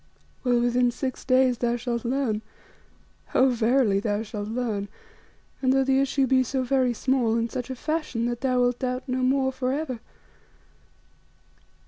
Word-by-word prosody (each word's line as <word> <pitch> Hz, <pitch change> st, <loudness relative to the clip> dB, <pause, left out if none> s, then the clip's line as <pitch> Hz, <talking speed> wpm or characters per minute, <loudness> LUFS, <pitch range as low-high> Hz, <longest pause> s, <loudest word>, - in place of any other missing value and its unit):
Well, 245 Hz, -2 st, +3 dB
within 245 Hz, +1 st, +2 dB
six 255 Hz, +1 st, -4 dB
days 255 Hz, -2 st, +3 dB
thou 240 Hz, -1 st, +1 dB
shalt 235 Hz, -1 st, -3 dB
learn 240 Hz, -4 st, 0 dB, 0.9 s
oh! 260 Hz, +1 st, +5 dB
verily 235 Hz, -3 st, +2 dB
thou 205 Hz, +1 st, -1 dB
shalt 210 Hz, -1 st, -6 dB
learn, 220 Hz, -3 st, -2 dB, 0.7 s
and, 260 Hz, -1 st, +3 dB
though 270 Hz, 0 st, +3 dB
the 265 Hz, 0 st, +2 dB
issue 275 Hz, 0 st, +1 dB
be 260 Hz, 0 st, +3 dB
so 255 Hz, +1 st, -1 dB
very 255 Hz, -1 st, +2 dB
small, 240 Hz, -1 st, +1 dB
in 230 Hz, 0 st, -1 dB
such 250 Hz, 0 st, -5 dB
a 260 Hz, -, -4 dB
fashion 305 Hz, -4 st, -2 dB
that 240 Hz, 0 st, -3 dB
thou 255 Hz, -2 st, +2 dB
wilt 245 Hz, 0 st, +1 dB
doubt 255 Hz, +1 st, -3 dB
no 255 Hz, 0 st, -1 dB
more 265 Hz, +1 st, +2 dB
for 255 Hz, -1 st, -2 dB
ever. 270 Hz, -4 st, -3 dB
250 Hz, 160 wpm, -25 LUFS, 235-265 Hz, 0.9 s, oh